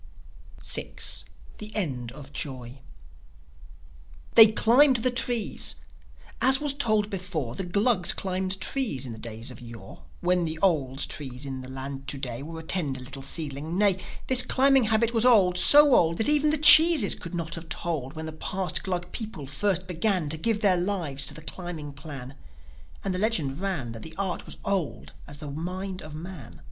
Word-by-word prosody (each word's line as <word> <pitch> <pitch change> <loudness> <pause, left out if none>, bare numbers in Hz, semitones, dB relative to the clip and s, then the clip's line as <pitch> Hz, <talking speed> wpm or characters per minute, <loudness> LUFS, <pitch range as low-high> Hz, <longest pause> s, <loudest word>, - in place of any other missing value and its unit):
VI. - - +1 0.7
THE 215 0 -8
END 130 - -3
OF 140 -1 -12
JOI 130 -3 -6 1.5
They 220 -1 +8
climbed 255 +5 +4
the 250 +1 +1
trees... 245 -3 0 0.7
As 265 +1 +4
was 290 -2 +1
told 215 -7 +1
before, 175 -10 -4
The 185 - -4
Glugs 200 0 +2
climbed 190 0 -3
trees 190 - -1
in 125 - -7
the 110 - -11
days 115 +3 -6
of 125 - -13
yore, 115 - -12 0.2
When 180 0 +1
the 160 -1 -4
oldes 140 -7 +1
tree 130 -4 -6
in 135 -1 -6
the 130 - -10
land 135 +1 -7
to 140 - -3
day 125 -2 -5
Was 160 +2 -8
a - - -16
tender 150 -7 0
little 135 +2 -9
seedling 150 +3 -4
Nay, 200 -2 +2 0.3
This 255 -1 +6
climbing 265 0 +4
habit 220 +1 +2
was 225 -1 +2
old, 195 -8 +4
so 290 +6 +7
old 165 -6 +3
That 220 - 0
even 300 0 +3
the 305 - +2
cheeses 310 - +8
could 170 +1 -8
not 170 -1 -4
have 165 -1 -6
told 155 -5 -3
When 160 -1 -7
the 160 - -5
past 180 +3 -4
Glug 180 -1 -4
people 215 - -7
first 185 +6 -1
began 180 -2 0
To 155 - -1
give 220 +4 0
their 195 -4 +3
lives 170 -8 -2
to - - 0
the 160 - -10
climbing 160 -4 -7
plan. 140 -3 -9 0.7
And 195 - -2
the 180 - -3
legend 165 -10 -1
ran 175 -12 -3
That 115 -1 -9
the 160 +6 -10
art 190 -3 -3
was - - -6
old 155 - -3
as 145 0 -10
the 145 -2 -7
mind 185 +5 -5
of 155 0 -10
man. 165 -5 -10
175 Hz, 180 wpm, -26 LUFS, 140-210 Hz, 1.5 s, They